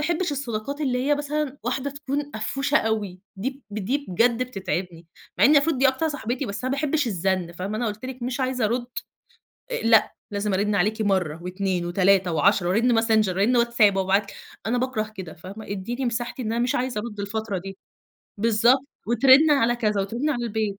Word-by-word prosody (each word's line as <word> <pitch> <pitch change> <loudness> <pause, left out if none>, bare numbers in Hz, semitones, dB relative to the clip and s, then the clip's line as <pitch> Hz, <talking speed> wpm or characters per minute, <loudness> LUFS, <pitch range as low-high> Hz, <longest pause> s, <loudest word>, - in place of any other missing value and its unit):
باحبش 335 +1 0
الصداقات 275 +1 -4
اللي 260 -4 0
هي 295 - +5
مثلًا، 290 -1 -3
واحدة 260 +3 -2
تكون 285 +1 -4
قفوشة 270 +6 0
أوي، 210 -7 -1 0.2
دي 265 +8 -4
ب 210 - -4
دي 265 +9 -2
بجد 230 +6 +2
بتتعبني، 185 -7 -4 0.3
مع - - +5
إن 295 +4 +7
مفروض 285 -1 +3
دي 270 - +5
أكتر 265 +5 0
صاحبتي، 260 -3 -3
بس 200 +4 -5
أنا 255 - 0
ما - - 0
باحبش 300 -2 0
الزن 185 -4 -1
فاهمة، 185 +5 -4
أنا 240 +2 -1
قُلت 215 +2 -5
لِك 260 -1 -7
مش 250 +2 -3
عايزة 255 -2 0
أرُد 240 +3 0 0.9
آآ - - -1
لأ، 225 -1 +4 0.2
لازم 205 0 -1
أرن 205 +2 +1
عليكِ 215 +4 +1
مرة 185 -7 0
و2 185 -1 -2
و3 185 +1 +3
و10 175 +3 +3
وأرن 225 +4 +3
Messenger، 220 -2 +3
وأرن 215 +7 +3
WhatsApp، 235 -4 +3
وأبعت 195 +1 +1
ل - - -13 0.3
أنا 240 +2 +1
باكره 230 -4 -2
كده، 185 -5 -7
فاهمة، 195 +6 -10
اديني 235 +7 -3
مساحتي 240 +2 -3
إن 220 -2 -2
أنا 235 +1 +1
مش 250 - 0
عايزة 250 -4 -1
أرُد 210 -2 -7
الفترة 205 0 -3
دي. 195 +1 -8 0.6
بالضبط، 235 +5 +3 0.2
وترن 265 +6 +6
على 240 -4 +3
كذا 210 -3 0
وترن 235 +10 -1
على 240 -5 -2
البيت 215 -3 -2
225 Hz, 195 wpm, -24 LUFS, 200-260 Hz, 0.9 s, إن